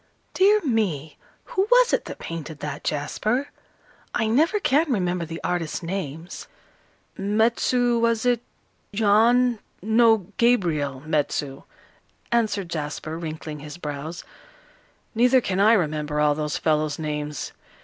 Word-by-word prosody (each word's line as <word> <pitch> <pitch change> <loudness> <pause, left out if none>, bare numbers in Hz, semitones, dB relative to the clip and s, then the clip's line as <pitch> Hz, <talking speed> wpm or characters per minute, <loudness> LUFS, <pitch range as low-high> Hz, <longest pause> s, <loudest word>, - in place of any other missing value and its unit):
"Dear 415 +3 +4
me, 190 - -1 0.3
who 385 +2 -1
was - - +5
it - - +1
that - - -7
painted 160 -2 -7
that, 145 -1 -6
Jasper? 215 - -1 0.7
I 225 - +1
never 310 - +2
can 305 -4 +2
remember 180 -5 0
the 165 +1 -7
artists' 175 -1 -2
names." 165 -2 -5 0.7
"Metsu 235 +4 +2
was 230 0 +1
it 245 -2 +2 0.5
Jan 230 +3 +4 0.2
no, 220 -1 +3
Gabriel 160 - +1
Metsu," 145 -2 -1 0.7
answered 210 -6 0
Jasper, 155 +1 -4
wrinkling 155 -2 -6
his 150 +3 -9
brows. 150 +1 -6 0.9
"Neither 250 +3 +4
can 195 -5 -2
I 215 +3 +6
remember 150 -6 0
all 150 0 +4
those 150 0 -2
fellows' 155 -2 0
names. 150 -1 -4
180 Hz, 120 wpm, -24 LUFS, 150-235 Hz, 0.9 s, I